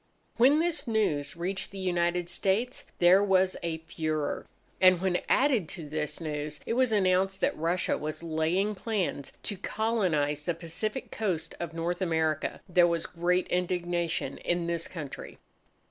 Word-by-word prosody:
When 260 +5 +6
this 335 -3 0
news 165 -11 0
reached 190 +3 -2
the 195 - -10
United 175 -2 0
States, 200 +8 -1
there 180 +3 +6
was 190 -2 +3
a 170 -1 -2
furore. 155 -2 -2 0.3
And, 185 -1 +7
when 180 -1 +1
added 255 - +3
to 165 -4 -7
this 150 0 -3
news, 150 -2 -4
it - - -1
was 255 -1 +3
announced 190 -1 +2
that - - +2
Russia 170 +3 0
was 155 +2 -4
laying 165 +6 +1
plans 190 - -2
to 205 - -3
colonize 180 -10 0
the 175 - 0
Pacific 180 +9 -4
coast 170 -7 -2
of 165 -1 -5
North 170 +2 -2
America, 160 -3 0
there 175 -1 +5
was 170 -1 0
great 180 +1 +1
indignation 175 -5 -1
in 175 -1 0
this 170 0 -2
country. 150 -6 -7
175 Hz, 150 wpm, -29 LUFS, 160-195 Hz, 0.3 s, And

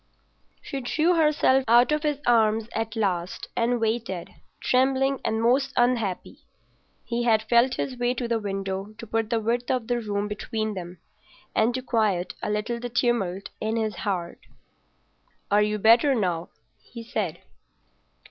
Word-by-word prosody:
She 275 - -5
drew 315 +8 +2
herself 300 -5 +3
out 240 +4 +5
of 300 0 +1
his 295 -2 -1
arms 225 -2 +3
at 225 +1 -3
last 185 -5 -2
and 240 +1 +1
waited, 220 -5 -2 0.3
trembling 265 +1 +2
and 220 - 0
most 260 +4 +2
unhappy. 240 -6 0 0.7
He 235 0 -2
had 225 -2 +3
felt 235 +3 +3
his 260 - -3
way 245 0 0
to 240 -1 -3
the 230 -1 0
window 195 0 -4
to - - -8
put 225 0 -1
the 230 -2 +1
width 235 +2 -1
of 250 -3 0
the 240 +1 0
room 205 -1 -2
between 215 +1 -3
them, 180 -2 -7 0.6
and 220 +2 +3
to 255 - -3
quiet 200 -7 0
a - - -3
little 210 +3 -2
the 245 +1 -5
tumult 225 -6 0
in 220 +1 -1
his 215 -4 -1
heart. 180 -4 -3 1.1
"Are 205 +1 +5
you 210 0 +1
better 235 +6 +5
now?" 175 -6 -1 0.3
he 235 -1 -10
said. 210 -7 -3
225 Hz, 155 wpm, -25 LUFS, 210-245 Hz, 1.1 s, out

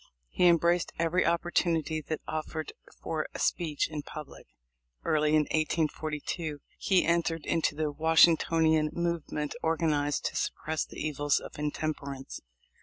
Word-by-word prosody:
He 180 - +4
embraced 170 +1 +3
every 170 +2 +2
opportunity 170 -2 +1
that 155 +1 -4
offered 155 0 -4 0.3
for 155 -1 -2
a - - -2
speech 155 -4 0
in 155 -1 -5
public. 150 0 -10 0.6
Early 155 0 +3
in 155 - +5
1842 155 0 -1 0.2
he 190 -2 +3
entered 170 -1 +1
into 165 -3 +1
the 155 -1 -1
Washingtonian 160 0 +4
movement 170 -3 -2
organized 155 -3 0
to - - -2
sup - - -1
press 160 0 -2
the - - -12
evils 145 -1 0
of - - -10
intemperance. 145 -2 -4
155 Hz, 130 wpm, -29 LUFS, 150-165 Hz, 0.6 s, in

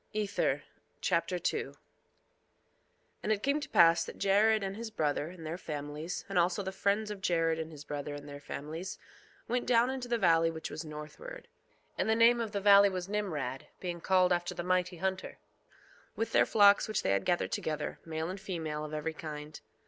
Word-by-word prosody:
Ether 210 -1 0 0.4
Chapter - - 0
2 - - 0 0.2
2:1 - - -23 1.5
And 215 - -1
it 210 -1 0
came 280 +2 +2
to 280 -2 -7
pass 170 -4 +6
that - - -9
Jared 210 +2 +3
and 195 0 -3
his 230 +1 -5
brother, 150 -7 -1
and 170 -1 -10
their 165 +3 -4
families, 150 +1 -5
and - - +1
also 175 +4 +1
the 190 - -3
friends 205 +2 0
of 205 -2 -7
Jared 165 -3 +1
and 160 0 -5
his 150 -2 -10
brother 145 0 -5
and 145 0 -9
their 145 0 -8
families, 160 +6 -6 0.5
went 245 +1 -1
down 240 +1 +4
into 260 -2 -4
the 240 -1 +1
valley 165 -5 +4
which 160 -1 -6
was 155 - -5
northward, 155 - -9 0.5
(and - - +1
the 220 - +4
name 235 +1 +5
of 225 -2 -3
the 200 - -1
valley 200 0 +7
was 185 -1 -4
Nimrod, 155 -11 -3
being 175 -2 -4
called 185 0 +4
after 175 0 -2
the 175 - -4
mighty 180 0 0
hunter) 190 +1 -3 0.8
with 225 - -2
their - - +4
flocks 205 -1 +6
which 215 - -1
they - - +1
had 100 0 +1
gathered 175 - 0
together, 155 -1 -3
male 160 0 -3
and 190 +1 -7
female, 160 -6 -4
of 155 0 -5
every 155 +1 -3
kind. 150 -1 -8
180 Hz, 195 wpm, -31 LUFS, 155-205 Hz, 1.5 s, valley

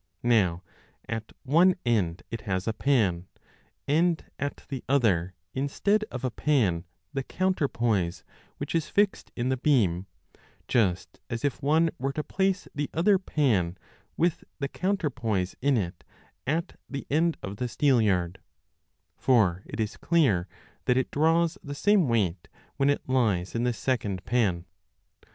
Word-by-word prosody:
Now 100 -7 +2 0.4
at 110 -1 -4
one 170 +7 +5
end 95 -8 +1
it 115 -1 -4
has 95 -1 -2
a 110 - +1
pan, 105 -9 +1 0.6
and 165 +3 +2
at 145 0 -4
the 130 -2 -5
other 95 -10 +2 0.2
instead 200 +10 +1
of 125 - -6
a 130 - 0
pan 105 - +1 0.3
the 135 - -1
counterpoise 120 - 0 0.3
which - - -5
is 165 -2 0
fixed 205 -1 +1
in 125 +1 -1
the 130 - +1
beam, 100 - +2 0.6
just 95 -6 0
as 115 +3 -2
if 140 - -1
one 160 +3 +3
were 135 +2 -1
to 155 - -2
place 195 +2 0
the 145 0 -2
other 185 +4 +4
pan 110 - +1 0.4
with 170 0 +1
the 140 - -2
counterpoise 125 - -1
in 140 -1 +3
it 90 -4 -3 0.4
at 165 +5 -1
the 140 0 -5
end 160 +3 +2
of 100 +1 -5
the 125 - -1
steelyard; 105 -11 +2 0.8
for 100 -9 +3
it - - -7
is 110 -1 -2
clear 125 - +2 0.4
that 125 -1 +3
it 130 - 0
draws 165 +2 +2
the 145 -1 -6
same 205 0 +3
weight 95 -7 0 0.3
when 135 0 +3
it 145 - 0
lies 110 -9 +1
in 120 +1 0
this 120 -2 0
second 105 -8 -1
pan. 95 -7 +1
125 Hz, 145 wpm, -27 LUFS, 100-150 Hz, 0.8 s, one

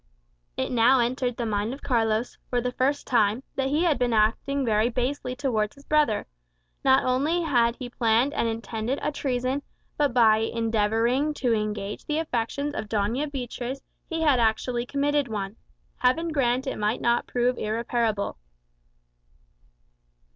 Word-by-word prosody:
It - - -1
now 245 +2 +5
entered 245 0 0
the 235 - -2
mind 215 +3 -1
of 280 - -16
Carlos, 225 -2 0
for 245 - +1
the 250 +1 -2
first 270 +3 0
time, 225 0 +2
that 270 -1 0
he 300 +4 +1
had 330 -5 +2
been 245 -2 +1
acting 240 +6 +1
very 220 0 +2
basely 250 +1 -2
towards 230 -6 -1
his 280 0 -17
brother. 300 -9 +2 0.6
Not 265 0 +4
only 290 +7 +1
had 240 -6 +2
he 250 - -6
planned 240 +3 +2
and 235 - 0
intended 225 +2 -3
a 300 - 0
treason, 260 -1 -1 0.4
but 290 -3 +2
by 225 -3 +5
endeavouring 225 +5 +1
to 245 -5 +1
engage 210 -2 -3
the 300 - 0
affections 285 -1 -2
of 215 -6 -5
Doña 230 +8 -1
Beatriz, 255 0 -5 0.3
he 325 -2 -2
had 285 -5 +4
actually 240 +2 0
committed 285 0 +1
one. 205 -2 -4 0.4
Heaven 290 +7 +2
grant 260 -4 +1
it 265 - -3
might 210 +3 0
not 235 0 +1
prove 245 0 0
irreparable! 220 - -1
245 Hz, 155 wpm, -26 LUFS, 225-275 Hz, 0.6 s, now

